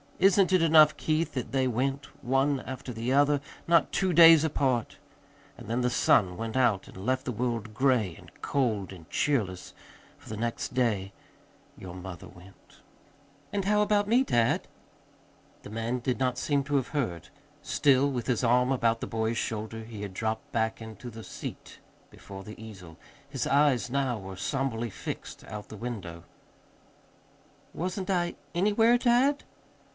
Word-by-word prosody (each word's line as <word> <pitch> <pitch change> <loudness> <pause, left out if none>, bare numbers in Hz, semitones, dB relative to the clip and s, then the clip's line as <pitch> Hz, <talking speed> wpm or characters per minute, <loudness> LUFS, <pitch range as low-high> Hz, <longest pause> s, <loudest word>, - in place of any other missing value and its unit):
Isn't 195 -1 +4
it 185 - +5
enough, 155 -2 +6
Keith, 160 +1 -1
that 125 -4 -4
they 130 -1 +1
went, 135 +4 -1 0.2
one 135 +2 +1
after 130 -1 -7
the 115 +3 -3
other, 145 +1 +4 0.3
not 170 -2 +4
two 185 -1 +1
days 165 -1 +8
apart? 130 -6 0 0.6
And 120 - -11
then 120 +3 -1
the 125 - +2
sun 90 -6 +3
went 115 +1 -4
out 120 -7 +2
and - - -13
left 130 +1 0
the 125 - -2
world 115 -2 -3
gray 120 -7 +1
and - - -15
cold 110 -9 -1
and 80 -4 -14
cheerless, 105 -11 -1 0.5
for - - -15
the 110 - -5
next 115 +1 -3
day 105 -6 0 0.7
your 90 -1 -9
mother 90 -3 -8
went." 95 +1 -18 0.7
"And 200 -2 -2
how 210 +1 +3
about 205 -1 +2
me, 240 +4 +4
dad?" 120 - +1 1.0
The - - -10
man 115 +3 -2
did 125 0 -2
not 125 -1 0
seem 140 0 0
to 145 - -1
have 135 -3 0
heard. 90 - -3 0.3
Still 140 -1 +3
with 125 -4 -4
his 125 -1 0
arm 125 +2 +3
about 115 -3 +1
the - - -3
boy's 110 0 -1
shoulder, 110 0 -4
he 110 -2 -9
had 100 -2 -6
dropped 110 +2 -3
back 110 0 -1
into 110 +2 -8
the 110 -1 -10
seat - - -8 0.3
before 95 -1 -10
the 105 +2 -11
easel. 90 -7 -11 0.3
His 135 -3 -3
eyes 140 -6 +3
now 135 -4 0
were 95 -1 -8
somberly 120 +2 -2
fixed - - -7
out 105 -1 -8
the 110 - -9
window. 95 -8 -6 1.5
"Wasn't 185 +2 -4
I 175 -2 0 0.2
anywhere, 210 +6 +3
dad?" 255 +4 +3
125 Hz, 160 wpm, -28 LUFS, 110-145 Hz, 1.5 s, days